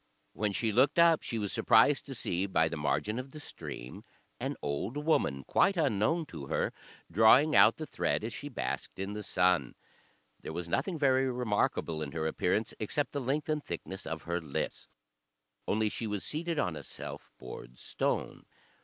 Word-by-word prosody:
When 105 -1 -1
she 110 +3 0
looked 130 +8 +3
up, 170 -1 +6
she 115 - -4
was 105 -2 -1
surprised - - +4
to - - -5
see 90 +3 -1
by 80 -4 +3
the 80 - -4
margin 105 +9 -1
of 130 +1 -8
the 155 - -8
stream 65 - -8 0.4
an - - -2
old 75 - -3
woman, 145 - +1
quite 195 - +3
unknown 150 - +2
to 75 - -8
her, - - 0 0.4
drawing 115 - +6
out - - +7
the 155 - -4
thread - - -1
as 115 +1 -4
she 145 - -6
basked 130 - -4
in 95 +2 -3
the 105 - -4
sun. 90 -8 +2 0.7
There - - -6
was 90 -1 -4
nothing 170 - -1
very 135 -2 +3
remarkable 105 -9 0
in 70 -2 -4
her 80 -1 -2
appearance, 100 +7 0
except 140 +7 -1
the 140 - -3
length 140 +4 -1
and 155 -1 -1
thickness 95 +1 -6
of 80 -1 -4
her 85 +1 -2
lips, 75 -4 -4 0.8
only 110 +1 +2
she 110 +2 -3
was 105 -2 -2
seated 165 +2 -2
on 90 - 0
a - - -6
self - - -8
bored 60 0 -10
stone. - - -2
105 Hz, 180 wpm, -31 LUFS, 85-145 Hz, 0.8 s, out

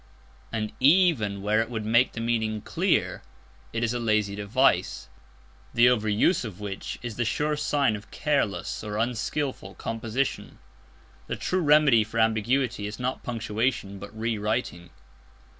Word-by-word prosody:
And, 110 -2 -2
even 135 - +3
where 105 +2 +2
it 115 - -3
would 110 -3 -4
make 120 +4 +3
the - - -5
meaning 110 -2 -1
clear, - - 0 0.5
it 115 0 -2
is 115 0 0
a 120 - -2
lazy 110 -3 +1
device, 105 +7 +1 0.7
the 120 +1 +6
over 110 -3 +1
use 115 - +2
of 105 -5 -7
which 100 -2 -5
is 120 -3 -5
the 120 - +1
sure 150 +6 0
sign 140 -5 +1
of 105 +1 -10
careless 140 -11 -1
or 105 -1 -4
unskilful 120 -1 -2
composition. 115 +4 -3 0.7
The - - -2
true 185 0 -1
remedy 150 -7 +5
for 110 +2 -4
ambiguity 115 +1 +1
is 105 - -6
not 125 +1 -2
punctuation, 115 -2 -2
but 100 +1 -8
re 115 -1 -1
writing. 105 -5 -2
115 Hz, 150 wpm, -26 LUFS, 105-125 Hz, 0.7 s, the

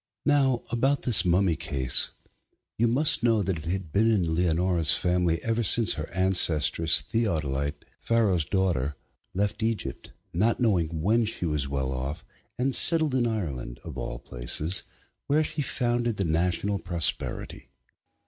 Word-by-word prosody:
Now 135 -4 +2
about 135 +4 0
this 115 -6 +3
mummy 90 -1 +2
case: 70 -6 0 0.7
you 120 - +1
must 140 +7 +2
know 115 -3 +2
that 90 -3 -2
it 80 - -11
had 90 -1 -4
been 110 +3 +3
in 90 -7 +1
Leonora's 85 -1 +2
family 90 -2 0
ever 115 0 0
since 115 +1 +4
her 75 +1 -6
ancestress, 85 -3 +3
Theodolitê, 75 - -1 0.3
Pharaoh's 105 -8 +1
daughter, 85 -8 -1 0.4
left 100 +3 -1
Egypt, 110 -3 -3 0.2
not 110 +7 +1
knowing 85 -9 0
when 115 +4 +2
she 105 -4 0
was 75 -4 -1
well 65 -1 -2
off, 65 +5 -5 0.3
and 130 +2 0
settled 160 -2 +3
in 125 -2 +1
Ireland, 70 - -4
of - - -8
all - - -5
places, 65 +9 +1 0.4
where 150 +2 +2
she 150 - -2
founded 120 -3 -1
the 100 - -2
national 90 +5 0
prosperity. 85 -2 -2
95 Hz, 145 wpm, -26 LUFS, 80-115 Hz, 0.7 s, since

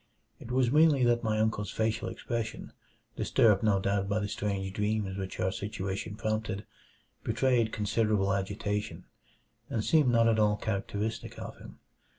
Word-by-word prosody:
It - - -10
was 125 -1 +2
merely 150 -3 +5
that 120 -1 +3
my 110 -1 +1
uncle's 110 -2 0
facial 110 +2 -1
expression, 115 -2 -4 0.4
disturbed 105 -4 +3
no 105 -3 +3
doubt 100 0 0
by 100 - +1
the 105 -1 -1
strange 100 -2 -3
dreams 105 -1 -1
which 95 -1 -5
our 95 - +1
situation 100 0 -4
prompted, 110 -1 -2 0.6
betrayed 115 0 +2
considerable 105 -2 +1
agitation, 105 +1 -3 0.6
and 110 -2 -1
seemed 155 -5 +4
not 115 -1 +4
at 110 -1 +3
all 105 -1 +4
characteristic 105 +1 -3
of - - -7
him. - - -12
110 Hz, 150 wpm, -30 LUFS, 100-115 Hz, 0.6 s, merely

